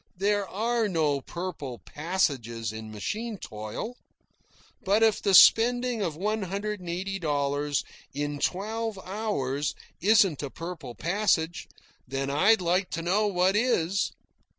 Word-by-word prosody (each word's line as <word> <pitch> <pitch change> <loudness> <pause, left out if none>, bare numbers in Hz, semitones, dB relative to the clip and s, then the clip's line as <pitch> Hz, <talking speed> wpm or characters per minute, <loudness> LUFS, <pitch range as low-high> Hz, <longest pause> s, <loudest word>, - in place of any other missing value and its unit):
There 200 +1 +1
are 225 +1 0
no 150 -6 +1
purple 160 -7 -6
passages 130 - -2
in 110 0 -7
machine 210 - -4
toil. 110 - -6 0.9
But 205 +3 +3
if 220 -2 +3
the 195 -2 +3
spending 245 +2 +6
of 165 -6 -1
one 210 +6 -1
hundred 200 +2 -3
and 180 -2 -8
eighty 190 +3 -3
dollars 145 -2 0 0.3
in 145 +1 -3
twelve 220 +5 -2
hours 165 -9 -2 0.3
isn't 195 -5 +4
a 140 - -4
purple 165 -6 -7
passage, 175 -2 0 0.4
then 135 +1 -2
I'd 190 +9 +4
like 180 +2 +1
to 165 - -4
know 200 +5 +2
what 185 0 +2
is. 200 -5 +1
180 Hz, 130 wpm, -27 LUFS, 145-210 Hz, 0.9 s, spending